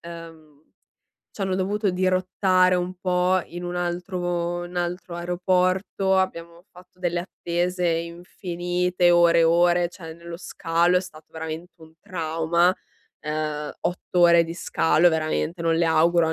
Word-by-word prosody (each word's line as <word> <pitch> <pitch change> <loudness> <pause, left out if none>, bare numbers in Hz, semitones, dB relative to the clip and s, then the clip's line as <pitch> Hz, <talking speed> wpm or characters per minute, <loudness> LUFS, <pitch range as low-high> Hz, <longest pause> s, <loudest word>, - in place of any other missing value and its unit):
ehm, 165 -3 -12 0.7
c'hanno 190 -2 -2
dovuto 200 +2 0
dirottare 185 0 +2
un 180 +1 -3
po' 180 0 +1
in 175 +1 -8
un 175 0 -4
altro 175 0 -2
n 180 0 -11
altro 175 0 -3
aeroporto, 185 +2 0
abbiamo 170 -2 -3
fatto 180 0 -18
delle 175 -1 -1
attese 180 0 -2
infinite, 175 +1 -1
ore 170 -1 +5
e - - +5
ore, 175 +1 +3
cioè 165 -3 -10
nello 170 0 -9
scalo 170 0 +1
è - - +3
stato 160 -4 -12
veramente 160 +2 -7
un 160 0 -15
trauma. 170 +1 +1 0.5
Ehm, 150 -1 -3
8 180 0 -2
ore 170 -1 +6
di 165 0 -6
scalo 165 -1 +2
veramente, 160 +1 -2
non 165 0 +2
le 170 - +2
auguro 165 +1 +3
a - - 0
175 Hz, 140 wpm, -24 LUFS, 165-180 Hz, 0.7 s, ore